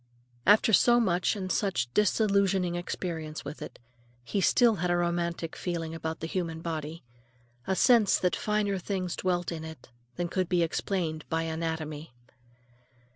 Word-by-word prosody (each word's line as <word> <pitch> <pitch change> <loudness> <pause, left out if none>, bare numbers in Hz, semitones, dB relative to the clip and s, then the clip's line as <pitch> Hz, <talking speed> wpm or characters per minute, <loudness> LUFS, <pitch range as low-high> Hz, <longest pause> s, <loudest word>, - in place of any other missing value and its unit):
After 215 +2 +5
so 240 +4 +6
much 180 -3 +1
and 185 -2 -4
such 150 - 0
disillusioning 200 -3 +2
experience 165 -3 -4
with 145 +2 -7
it, - - -8 0.5
he 195 - -1
still 230 +3 +4
had 175 +1 -1
a 175 - +2
romantic 170 -1 -1
feeling 165 -2 -3
about 160 0 -5
the - - -2
human 165 -2 -3
body; 160 -1 -5 0.6
a 190 - +1
sense 230 -1 +5
that 180 -1 +1
finer 210 -2 0
things 185 -1 -3
dwelt 175 -2 -1
in 160 -2 -5
it 160 -3 -10 0.3
than 175 - -2
could 185 0 -1
be 175 -2 +3
explained 165 -2 -2
by 165 0 0
anatomy. 160 -3 -4
175 Hz, 150 wpm, -28 LUFS, 160-195 Hz, 0.6 s, so